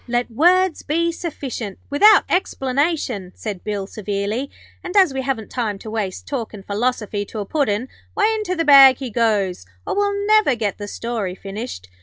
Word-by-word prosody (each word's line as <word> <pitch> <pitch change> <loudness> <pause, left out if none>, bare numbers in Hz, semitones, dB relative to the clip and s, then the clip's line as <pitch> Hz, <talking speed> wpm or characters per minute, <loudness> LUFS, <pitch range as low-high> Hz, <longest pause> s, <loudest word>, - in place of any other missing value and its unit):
'Let 240 0 -1
words 355 +7 +3
be 335 +3 0
sufficient, 270 - -6
without 410 +8 +6
explanation,' 275 - -1
said 205 -5 -6
Bill, 205 -2 -3
severely. 205 +6 -3 0.3
'And 365 +3 -3
as 370 -8 +5
we 265 - -2
haven't 255 -5 -3
time 220 -5 -2
to 215 +2 -9
waste 205 -4 -3
talkin' 225 -7 -5
philosophy 210 0 -2
to 220 - -9
a 205 - -3
Puddin', 250 -3 -1 0.3
why, 435 +1 +2
into 425 -4 -2
the 330 -1 -1
bag 275 -3 +8
he 260 -4 -6
goes, 205 - 0 0.2
or - - -2
we'll 405 0 0
never 430 -10 +4
get 215 -3 -3
the 205 - -5
story 215 -4 -4
finished.' 195 - -7
245 Hz, 170 wpm, -20 LUFS, 205-320 Hz, 0.3 s, bag